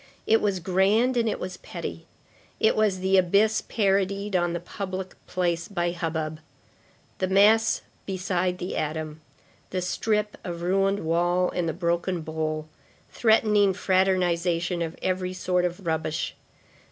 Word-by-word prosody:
It 225 +1 +4
was 200 -3 0
grand 195 +8 +2
and 230 -2 +2
it - - -3
was 185 -1 -5
petty. - - -7 0.5
It 220 - +3
was 210 -4 +1
the 190 +1 +3
abyss 200 +4 +3
parodied 200 -1 0
on 175 -1 +1
the 170 - -2
public 190 +1 -5
place 170 -2 -1
by 175 -3 -1
hubbub. 160 -2 -3 0.8
The 185 - +1
mass 215 +4 +4 0.2
beside 185 -1 -1
the 180 +1 -4
atom; 155 0 -3 0.5
the 185 - -2
strip 210 +3 -1
of 170 -1 -5
ruined 195 +2 +1
wall 175 +2 +2
and 175 -2 -1
the - - +1
broken 170 +1 -1
bowl,—threatening 160 +7 0
fraternization 180 -2 +1
of 165 0 -3
every 185 0 -1
sort 180 -1 0
of 180 +2 -4
rubbish. 160 -1 -2
185 Hz, 135 wpm, -26 LUFS, 170-195 Hz, 0.8 s, It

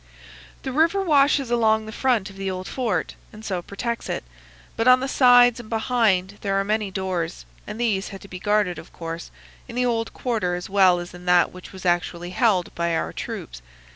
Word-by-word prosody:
"The 265 - -3
river 325 +8 +3
washes 280 -5 +3
along 220 -2 +2
the 220 - -7
front 225 -5 0
of - - -15
the 195 0 -3
old 185 0 -5
fort, 225 -10 -2 0.2
and 215 +1 -12
so 185 -4 -2
protects 230 +6 -4
it, - - -3 0.5
but 225 +2 0
on 255 0 +7
the 265 - -2
sides 245 -2 +6
and 225 -2 -10
behind 220 -4 +1
there 195 -1 0
are - - +1
many 210 0 -1
doors, 185 -3 -3 0.2
and 210 +2 -6
these 210 -5 0
had 195 -2 -9
to - - -12
be 185 -2 -8
guarded, 205 -3 +1
of - - -13
course, 165 0 -7 0.4
in - - -9
the 250 0 +1
old 225 -2 -1
quarter 215 -8 -1
as 180 +2 -7
well 190 -3 +5
as 175 0 -7
in 180 0 -11
that 180 0 +4
which 185 0 -11
was 190 -1 -11
actually 175 0 0
held 185 -3 +1
by 170 -1 -1
our - - -2
troops. - - -6
205 Hz, 205 wpm, -23 LUFS, 180-240 Hz, 0.5 s, on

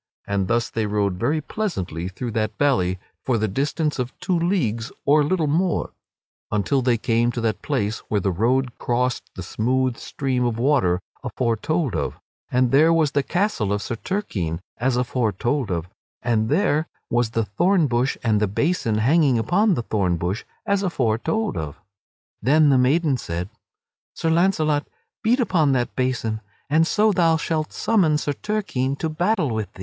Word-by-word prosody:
And 100 -2 -1
thus 120 +2 +1
they 110 -2 -1
rode 100 -3 0
very 155 +7 +1
pleasantly 95 - -3
through 115 +6 -5
that 110 0 -2
valley 95 -11 +2 0.3
for 125 -3 +1
the 110 0 0
distance 145 - -1
of 125 0 -4
two 185 - 0
leagues 160 - 0
or 150 +2 +5
a - - +3
little 165 +2 +1
more, 165 +4 0 0.6
until 105 +6 +1
they 125 -2 +2
came 115 +2 +1
to 120 - -3
that 110 -3 -1
place 115 -7 -1
where 105 - +1
the 95 0 0
road 120 +7 0
crossed 125 +1 -1
the 95 - -6
smooth 125 +5 0
stream 130 -3 -2
of 120 -2 0
water 115 -9 +2 0.2
afore 115 -2 0
told 155 +4 -1
of; 75 - -2 0.3
and 125 -1 +2
there 155 +5 +5
was 160 -3 +3
the 140 - +2
castle 175 - 0
of 105 0 -1
Sir 115 - -3
Turquine 105 - -3 0.2
as 125 +1 +1
afore 125 -2 0
told 120 +4 -1
of; 85 -2 -2 0.4
and 110 -2 +1
there 155 -1 +2 0.2
was 120 -1 +2
the 115 0 -1
thorn 175 - +2
bush 125 0 0
and 110 -3 +2
the 105 - +2
basin 115 - 0
hanging 135 +3 +3
upon 185 - +2
the 120 - -2
thorn 95 -6 0
bush 90 +7 -3 0.2
as 200 -2 +1
afore 125 - 0
told 220 - -1
of. 80 -4 -5 0.6
Then 150 +5 +4
the 135 - +5
maiden 140 +2 +2
said: 85 -3 -4 0.7
"Sir 165 - 0
Launcelot, 160 -4 +2 0.3
beat 235 +4 +2
upon 165 - +2
that 120 -2 -1
basin 120 -4 -1 0.3
and 160 +2 +4
so 215 +3 +3
thou 165 -4 +3
shalt 155 -1 -2
summon 180 -9 +2
Sir 145 -1 -2
Turquine 140 -9 -2
to 160 - -2
battle 175 - 0
with 110 -2 -3
thee." - - -16
130 Hz, 175 wpm, -23 LUFS, 110-160 Hz, 0.7 s, or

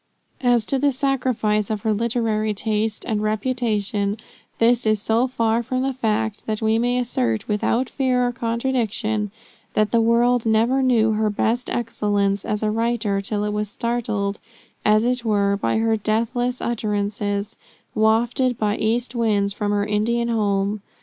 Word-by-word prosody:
As 245 -3 +3
to 270 - 0
the 285 +1 +3
sacrifice 255 -6 0
of 215 -2 -2
her 220 0 +1
literary 220 -1 0
taste 215 +1 -1
and 215 -2 -1
reputation, 215 -2 -1 0.4
this 240 +1 +3
is 215 -1 +2
so 225 +4 +1
far 230 -2 +1
from 255 +2 -2
the 270 0 0
fact, 220 -3 -2
that 215 -1 -1
we 220 0 +2
may 245 +1 +1
assert 125 - -1
without 230 +4 0
fear 255 -2 +1
of 245 - -1
contradiction, 230 -3 -1 0.4
that 215 0 +1
the 235 - +3
world 235 +1 +3
never 230 +4 +2
knew 235 -4 +3
her 215 0 +1
best 230 +4 0
excellence 205 -4 0
as 210 0 -2
a 215 - +1
writer, 220 -3 0
till 205 +1 -2
it 210 0 -1
was 210 -1 -2
startled, 215 -3 -2 0.4
as 215 +1 +4
it 250 0 0
were, 200 -3 +2
by 200 - 0
her 225 0 +2
deathless 235 +4 -1
utterances, 205 -1 -2 0.4
wafted 235 +3 +2
by 210 0 0
east 235 +3 0
winds 210 -4 +1
from 205 0 -2
her 205 0 +1
Indian 235 +3 0
home. 205 -2 0
220 Hz, 155 wpm, -22 LUFS, 210-240 Hz, 0.4 s, as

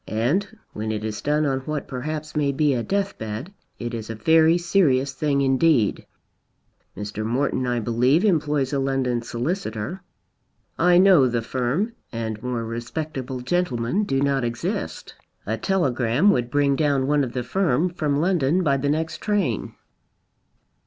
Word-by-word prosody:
And 175 - -1 0.2
when 110 +1 -3
it 110 -1 -3
is 110 -1 -4
done 150 +1 +1
on 135 -2 0
what 150 +2 -4
perhaps 155 +4 -5
may 145 -2 +1
be 145 +1 +2
a 120 - 0
death 200 +8 -2
bed, 110 - -5 0.2
it 120 0 -5
is 115 -2 -5
a 115 - -4
very 160 +8 +4
serious 145 -7 +2
thing 140 0 0
indeed. 135 -3 +2 0.9
Mr. 105 +1 -4
Morton, 130 +2 0
I 120 -1 0
believe, 125 - +2
employs 150 -7 +1
a 140 - +1
London 135 -3 0
solicitor. 120 - -3 0.7
I 175 +1 +4
know 180 -8 +6
the 120 -2 -1
firm 130 - -1 0.2
and 110 -2 -4
more 125 -2 -3
respectable 130 +2 -5
gentlemen 155 - 0
do 135 -9 0
not 140 -2 +1
exist. 120 0 -4 0.3
A 110 - -1
telegram 135 - +2
would 120 -5 0
bring 140 +1 +2
down 140 -3 +1
one 145 +1 +2
of 125 -2 -4
the 125 - -2
firm 165 +2 +1
from 150 -4 -1
London 175 0 +2
by 140 -4 +2
the 140 +1 -1
next 160 +2 -1
train." 200 - -1
135 Hz, 155 wpm, -23 LUFS, 120-160 Hz, 0.9 s, know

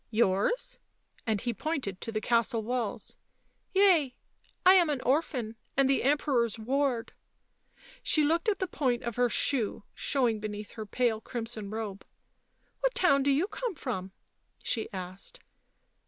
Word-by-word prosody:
" - - -45
Yours?" 200 - 0 0.5
and 215 -2 +1
he 240 -1 -1
pointed 265 - -3
to 225 - -4
the 215 - -1
castle 230 0 +1
walls. 235 -2 -3 0.3
" - - -44
Yea. 345 -10 +4 0.5
I 370 - +9
am 355 -4 +5
an 290 -3 0
orphan, 255 -5 0 0.2
and 275 -1 +5
the 270 0 +2
Emperor's 260 -5 +1
ward." 255 +1 -1 0.9
She 305 - +4
looked 330 +7 +2
at 405 - +1
the 375 - -1
point 255 -8 -1
of 235 -2 -3
her 245 0 +3
shoe 230 -3 0
showing 245 -6 +1
beneath 210 0 -6
her 215 -2 -7
pale 225 0 0
crimson 225 -3 -5
robe. 215 -2 -5
u - - -38 0.7
What - - 0
town 280 -7 +4
do 280 - +2
you 285 +6 +3
come 455 0 -4
from 195 -10 -4 0.3
?" - - -36
she 225 - -2
asked. 190 - -7
245 Hz, 160 wpm, -29 LUFS, 220-295 Hz, 0.9 s, I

